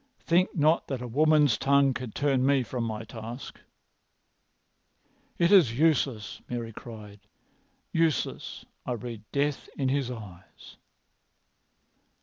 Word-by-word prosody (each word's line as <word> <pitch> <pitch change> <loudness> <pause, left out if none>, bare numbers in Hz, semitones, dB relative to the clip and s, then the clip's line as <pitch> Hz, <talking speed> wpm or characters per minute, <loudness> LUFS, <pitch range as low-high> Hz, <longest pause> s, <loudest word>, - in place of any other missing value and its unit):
Think 175 +2 +2
not 155 +1 +3
that 130 -3 -4
a - - -5
woman's 150 +1 +3
tongue 140 0 +4
can 130 -2 -5
turn 135 -1 +1
me 135 -1 +3
from 120 0 -3
my 110 0 -4
task." 115 +3 -8 1.8
"It 170 +1 +3
is 150 - +6
useless!" 135 -9 +1
Mary 115 -2 -4
cried. 105 -3 -10 0.7
"Useless! 165 -2 -1 0.2
I 125 - -2
read 115 -1 -6
death 145 0 -1
in 135 -2 0
his 135 -2 0
eyes." 100 -7 -11
130 Hz, 120 wpm, -28 LUFS, 115-145 Hz, 1.8 s, is